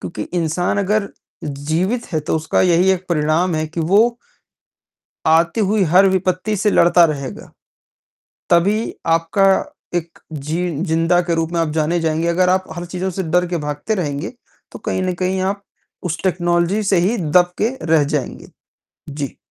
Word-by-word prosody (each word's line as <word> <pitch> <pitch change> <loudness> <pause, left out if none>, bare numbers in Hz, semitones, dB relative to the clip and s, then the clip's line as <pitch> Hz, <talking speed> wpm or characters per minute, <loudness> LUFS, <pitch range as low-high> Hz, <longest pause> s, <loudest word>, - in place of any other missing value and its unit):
क्योंकि - - -5 0.2
इंसान 170 +4 0
अगर 200 +1 0 0.4
जीवित 160 - -2
है, 155 - 0
तो 150 - -1
उसका 160 0 0
यही 180 +1 +4
एक 185 -1 -3
परिणाम 165 +2 +1
है 155 0 -1
कि 165 +2 -5
वो 210 +8 +3 1.1
आती 165 +6 +3
हुई 210 0 +2
हर 185 +3 +6
विपत्ति 185 +3 0
से 210 +2 +2
लड़ता 175 0 +5
रहेगा। 140 -4 -5 1.0
तभी 200 +6 +2
आपका 165 +4 +2 0.5
एक 170 -1 -3
जि 155 +2 -4 0.3
ज़िंदा 165 +2 +2
के 170 - +2
रूप 165 0 -2
में 170 - 0
आप 165 - 0
जाने 160 +2 0
जाएँगे, 160 0 0
अगर 180 +2 +2
आप 185 +1 +2
हर 175 - -5
चीज़ों 180 +2 -3
से 190 +1 -3
डर 180 +1 +1
के 175 - -2
भागते 150 +9 -2
रहेंगे, 155 -3 -3 0.4
तो - - -8
कहीं - - -2
न 185 -1 -1
कहीं 185 +1 0
आप 200 0 -6 0.4
उस 170 -1 -3
टेक्नोलॉज़ी 175 +2 +1
से - - +5
ही 235 - 0
दब 175 +1 +2
के 230 +5 0 0.2
रह 150 -2 +4
जाएँगे। 140 -4 -4 0.6
जी। 145 -1 -5
175 Hz, 165 wpm, -19 LUFS, 160-185 Hz, 1.1 s, हर